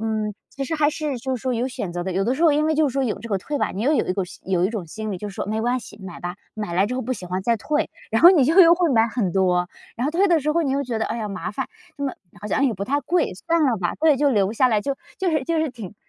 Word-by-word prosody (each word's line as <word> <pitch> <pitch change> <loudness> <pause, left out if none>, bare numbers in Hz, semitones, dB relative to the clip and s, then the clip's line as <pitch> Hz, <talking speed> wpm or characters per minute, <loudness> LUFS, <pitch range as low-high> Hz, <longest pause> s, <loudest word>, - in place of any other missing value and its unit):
嗯， 215 -2 -1 0.2
其 275 - -4
实 320 - -3
还 300 -1 +3
是 300 -4 -3
就 260 +2 -2
是 - - -10
说 255 +1 -1
有 240 +3 -1
选 200 -8 -5
择 175 - -3
的。 190 - -3
有 190 +2 0
的 245 +5 +1
时 320 - -2
候 330 - +6
因 300 +1 +2
为 315 - +2
就 310 -1 +3
是 255 - -5
说 275 0 0
有 230 - -2
这 235 - -8
个 200 - 0
退 290 +10 -4
吧， - - 0
你 200 - -4
又 285 +6 +3
有 - - +2
一 - - 0
股 195 +1 -1 0.2
有 185 -2 +1
一 - - +2
种 210 -6 -4
心 215 +5 -5
理， - - -3
就 210 +3 -5
是 195 - -10
说 - - -3
“没 215 +2 -1
关 245 +3 +1
系， 210 -2 -12
买 185 -2 -8
吧， 175 +1 -4 0.2
买 210 -5 -4
来 190 +3 +3
之 250 +4 -3
后 - - -1
不 255 - -2
喜 215 - -6
欢 180 +1 -2
再 230 +2 +2
退”， 300 +8 -1 0.2
然 225 - +2
后 345 - +11
你 325 -8 +5
就 320 +8 +3
又 340 -1 +8
会 350 -2 +1
买 230 -3 +4
很 220 -5 -1
多， 180 -2 +2 0.3
然 240 - -3
后 290 - +1
退 365 +5 +3
的 340 -4 +3
时 300 +2 0
候 335 +2 +2
你 275 -4 0
又 280 +1 0
觉 245 -4 -3
得， - - 0
哎 - - -3
呀， 215 -3 -3
麻 200 - -5
烦。 - - -3 0.3
这 285 - -6
么 270 - -1 0.3
好 210 - -6
像 275 - +1
也 240 - 0
不 200 +1 -4
太 285 +4 0
贵， 340 +5 +1
算 335 -1 +3
了 255 -5 +2
吧。 175 -2 -1
对， 310 -2 +5
就 290 +2 +3
留 205 -4 +2
下 255 +3 +3
来， 215 -3 +2
就 275 +5 -2 0.2
就 375 -2 +1
是 310 -4 0
就 330 +3 0
是 315 -4 0
挺 220 -6 -9
245 Hz, 365 characters per minute, -23 LUFS, 205-295 Hz, 0.3 s, 后